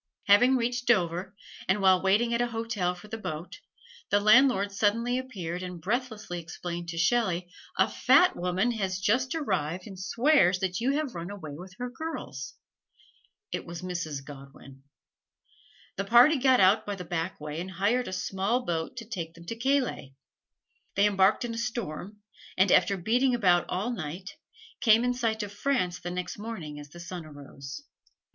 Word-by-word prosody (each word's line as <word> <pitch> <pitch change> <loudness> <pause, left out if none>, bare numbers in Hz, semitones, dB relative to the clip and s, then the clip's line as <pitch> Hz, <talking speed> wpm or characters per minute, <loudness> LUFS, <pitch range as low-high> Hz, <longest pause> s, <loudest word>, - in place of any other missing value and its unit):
Having 245 +6 +6
reached 240 0 -2
Dover, 185 -3 +1 0.3
and 190 +2 +2
while 190 -2 +5
waiting 215 +5 +2
at 235 - +1
a 240 - +1
hotel 225 -6 -2
for 180 +4 -13
the 225 +1 -6
boat, 160 -3 -6 0.5
the 205 - +4
landlord 215 -1 +5
suddenly 230 +5 +1
appeared 185 -9 -5
and 180 -1 -6
breathlessly 210 -2 -3
explained 170 0 -6
to 165 - -5
Shelley, 180 -1 +1 0.3
"A - - +4
fat 365 - +4
woman 180 +6 0
has 195 -5 -2
just 250 +8 +1
arrived 185 - -2
and 195 -3 -10
swears 210 - +3
that 185 -1 -2
you 265 +4 +2
have 295 -3 -2
run 170 +1 -6
away 190 -7 -7
with 180 +4 -10
her 250 - -3
girls!" 245 - -6 1.0
It - - -3
was 170 +1 -7
Mrs. 165 -6 -4
Godwin. 135 -1 -12 1.2
The 195 - -2
party 245 +8 +6
got 260 -1 +4
out 190 +3 +5
by 205 - -4
the 180 -2 -8
back 170 +2 -3
way 150 +2 -5
and 185 - -6
hired 205 +7 0
a - - -5
small 195 +6 -1
boat 165 +7 -3
to 230 - -6
take 170 -7 -5
them 170 0 -13
to 230 - -5
Calais. 245 - -1 0.8
They 200 - +4
embarked 200 +3 +3
in 235 - -4
a 230 - -4
storm, 210 -4 -5 0.4
and 190 0 +4
after 195 +2 +4
beating 245 +7 +2
about 180 -6 +3
all 200 +7 -1
night, 180 -1 -6 0.5
came 230 -3 +5
in 250 0 +1
sight 225 -3 -1
of 205 - -6
France 205 -6 0
the 175 - -5
next 180 +2 -5
morning 175 -10 -6
as 145 0 -11
the 175 - -12
sun 175 0 -7
arose. 140 -2 -10
195 Hz, 175 wpm, -28 LUFS, 175-235 Hz, 1.2 s, Having